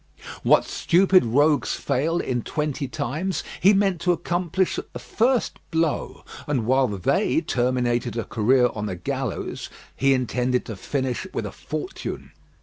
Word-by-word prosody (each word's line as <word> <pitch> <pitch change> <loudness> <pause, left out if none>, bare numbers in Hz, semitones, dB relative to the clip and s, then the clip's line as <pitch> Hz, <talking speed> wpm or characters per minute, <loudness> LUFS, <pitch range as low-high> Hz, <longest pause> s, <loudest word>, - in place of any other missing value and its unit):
What - - +4
stupid 185 +1 +4
rogues 145 +6 +2
fail 160 +6 0
in 125 -7 -1
twenty 150 +1 -2
times, 155 - -3 0.2
he 195 - +7
meant 195 -4 +2
to 180 - +2
accomplish 175 +2 0
at - - -10
the - - -5
first 240 +1 0
blow; 160 -2 -1 0.2
and 135 -6 0
while 130 +2 +3
they 100 -5 +1
terminated 120 -2 0
a 115 - -1
career 125 +2 +2
on 105 -1 -4
the 95 - -3
gallows, 85 - -4 0.3
he 135 0 +3
intended 125 0 0
to 110 - -6
finish 130 +5 -3
with - - -2
a - - -5
fortune. - - -6
135 Hz, 145 wpm, -24 LUFS, 120-170 Hz, 0.3 s, he